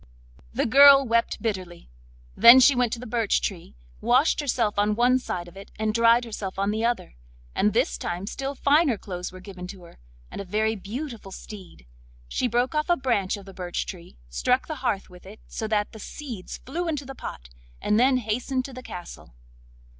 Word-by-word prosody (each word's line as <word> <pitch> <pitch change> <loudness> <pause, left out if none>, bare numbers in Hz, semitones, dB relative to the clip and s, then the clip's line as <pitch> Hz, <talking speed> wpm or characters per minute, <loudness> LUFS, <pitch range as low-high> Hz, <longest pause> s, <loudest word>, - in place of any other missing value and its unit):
The - - 0
girl 275 +2 +8
wept 230 0 0
bitterly; 185 - -4 0.4
then 240 +3 +9
she 275 +2 +7
went 245 -3 +1
to 235 - -4
the 250 - -8
birch 230 -2 +1
tree, 175 - -5 0.3
washed 245 +6 +3
herself 235 -8 0
on 210 +1 +2
one 250 +3 +3
side 175 -8 -5
of 175 - -14
it 195 +1 -11
and 215 0 -1
dried 230 +1 +4
herself 205 -4 -6
on 200 +1 0
the 220 +2 -2
other; 235 - -1 0.4
and 210 - +2
this - - 0
time 175 +2 -4
still 275 +6 -4
finer 285 -2 +3
clothes 180 -2 -6
were 185 - -11
given 185 -1 -9
to 185 -1 -10
her, 170 - -16 0.3
and - - -6
a - - -5
very 215 +3 0
beautiful 225 +1 -7
steed. 190 - -11 0.4
She 250 - -1
broke 245 +3 0
off 305 +1 -1
a 350 - +4
branch 220 -7 0
of 200 - -12
the 195 - -11
birch 180 -1 -4
tree, 170 - -10
struck - - +1
the - - -5
hearth 195 - -1
with 180 0 -14
it, 210 +3 -12
so 220 - -4
that 210 -1 0
the 220 - -11
seeds 235 -5 -7
flew 340 +7 -3
into 295 -4 -2
the 270 - -7
pot, - - -8 0.3
and 210 - +1
then 255 +1 +4
hastened 250 +3 -2
to 270 - -9
the 255 - -8
castle. 175 - -10
220 Hz, 200 wpm, -25 LUFS, 190-255 Hz, 0.4 s, then